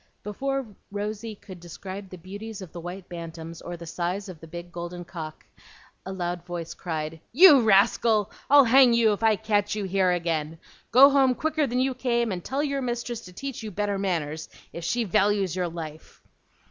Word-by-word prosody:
Before 270 +6 -2 0.2
Rosy 210 +2 -4
could 190 -3 -12
describe 190 +3 -8
the 185 - -9
beauties 205 +5 -8
of 175 - -11
the 175 - -8
white 180 +2 -7
bantams 165 -1 -8
or 175 0 -6
the 170 - -9
size 180 +4 -3
of 175 -4 -9
the 165 - -12
big 175 +2 -8
golden 175 0 -6
cock, 160 -3 -8 0.6
a - - -4
loud 175 -2 -3
voice 175 -2 -5
cried, 160 -2 -5
"You 295 -1 +8
rascal! 215 0 +3 0.2
I'll 285 0 +8
hang 250 0 +6
you 225 -2 +4
if 205 - -5
I 220 -1 +4
catch 205 0 0
you 210 - -2
here 190 -1 +2
again. 165 -2 -1 0.3
Go 275 +4 +8
home 265 -2 +4
quicker 310 0 0
than 250 0 -1
you 260 +1 +1
came, 235 -3 0
and 180 -2 -4
tell 275 +2 -1
your 280 -2 -1
mistress 240 -2 -3
to 180 - -11
teach 270 +8 -6
you 220 - -5
better 205 0 -2
manners, 160 -5 -2 0.2
if 170 - -6
she 235 +8 0
values 200 -2 +1
your 180 -1 0
life." 160 -2 -9
195 Hz, 190 wpm, -26 LUFS, 175-235 Hz, 0.6 s, You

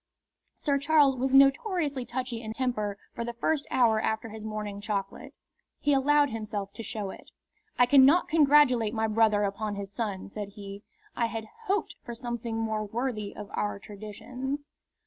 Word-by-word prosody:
Sir 280 -2 0
Charles 290 -2 +4
was 260 +1 -1
notoriously 275 - +3
touchy 250 -2 -4
in 220 -1 -5
temper 220 -5 -1 0.2
for 235 - -4
the 235 0 -4
first 290 +5 0
hour 230 -4 +3
after 220 0 -1
his 215 0 -9
morning 210 -2 -5
chocolate. 200 -2 -4 0.4
He 290 - +2
allowed 285 +1 +4
himself 210 -3 -4
to - - -7
show 210 -3 -4
it. - - -13 0.5
"I 245 - +6
cannot 275 +6 +6
congratulate 285 -8 +4
my 220 0 +1
brother 215 -1 +3
upon 205 +1 -2
his 200 0 -6
son," 205 -5 -3
said 200 0 -7
he. 200 -1 -9 0.3
"I 235 - +1
had 225 -1 -5 0.2
hoped 410 0 0
for 235 - -7
something 235 -1 -4
more 220 -1 -1
worthy 215 -1 -3
of 210 -1 -8
our 205 -1 -1
traditions." 250 +8 -6
230 Hz, 165 wpm, -28 LUFS, 210-270 Hz, 0.5 s, I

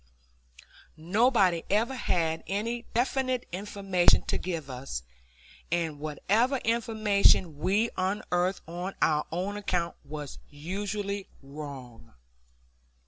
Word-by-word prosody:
Nobody 190 0 +3
ever 225 +6 +2
had 165 -9 0
any 230 +5 -2
definite 255 +1 0
information 195 -1 +3
to - - -1
give 165 -5 -3
us, 125 - -5 0.7
and 165 -4 0
whatever 210 - +1
information 215 - +3
we 205 +8 +2
unearthed 185 -1 0
on 175 +3 -5
our 150 -1 +2
own 190 +5 -2
account 180 -4 -1
was 145 -1 -7
usually 200 +6 -3 0.2
wrong. 135 - -9
185 Hz, 95 wpm, -29 LUFS, 160-210 Hz, 0.7 s, Nobody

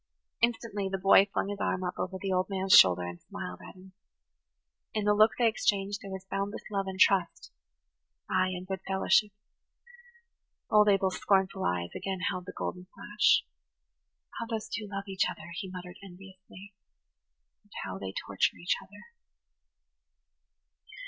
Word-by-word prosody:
Instantly 225 -4 0
the 195 - -2
boy 195 +1 +6
flung 200 - -1
his 205 -1 -5
arm 185 - -1
up 180 - -2
over 190 +1 -3
the 195 0 -3
old 185 +1 0
man's 190 -1 +1
shoulder 90 -1 +8
and 90 0 -7
smiled - - -7
at - - -12
him. 190 +1 -15 1.0
In 215 -1 0
the 210 - +4
look 215 +1 +5
they 240 - +4
exchanged 205 -2 0
there 200 - -9
was 190 0 -7
boundless 195 +2 -4
love 195 -1 -1
and 190 0 -6
trust–ay, 65 - -1
and 185 0 -5
good 190 0 -4
fellowship. 195 +2 +3 1.4
Old 210 -1 +6
Abel's 195 -2 +2
scornful 195 -1 +1
eyes 85 -1 -1
again 190 -1 -4
held 180 0 -6
the - - -5
golden 180 0 -5
flash. 210 0 +2 1.0
"How 230 - -4
those 225 -2 -4
two 210 -1 -4
love 195 0 -4
each 190 -1 0
other!" 165 +2 -9
he 190 - -6
muttered 180 0 -9
enviously. 195 +1 -13 0.9
"And 205 - -32
how 95 +1 -6
they 95 -1 -5
torture 100 0 -1
each 175 - 0
other!" 200 +2 -15
190 Hz, 155 wpm, -29 LUFS, 180-200 Hz, 1.4 s, shoulder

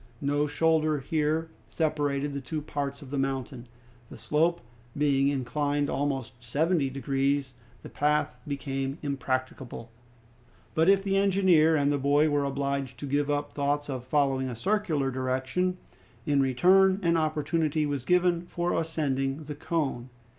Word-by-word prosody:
No 145 +1 0
shoulder 155 0 +2
here 155 +3 -1 0.2
separated 145 -2 -1
the 140 - -4
two 155 +4 -4
parts 145 -1 -4
of 135 - -12
the 140 - -1
mountain. 135 -2 -3 0.4
The - - -10
slope, 155 +9 +1 0.4
being 140 -2 +3
inclined 145 +1 0
almost 130 -4 -3
seventy 145 +4 +1
degrees, 135 0 -1 0.3
the - - -8
path 150 -2 0
became 135 -1 -3
impracticable. 130 -4 -3 0.8
But 160 +3 +3
if 195 0 +4
the 195 -1 +1
engineer 185 -5 +4
and 145 -1 +2
the 145 - 0
boy 145 +3 +3
were 145 -1 +1
obliged 140 -2 -2
to - - -3
give 145 +1 0
up 145 0 -1
thoughts 145 0 -1
of 130 -2 -4
following 135 -1 +1
a 120 - -5
circular 165 - 0
direction, 130 +8 -1 0.5
in 145 -2 +2
return 185 +9 +4
an 170 -1 +3
opportunity 155 0 0
was 140 -3 -2
given 175 +1 +2
for 175 0 -1
ascending 145 -3 -1
the 150 0 -6
cone. 145 -5 -2
145 Hz, 145 wpm, -28 LUFS, 135-160 Hz, 0.8 s, if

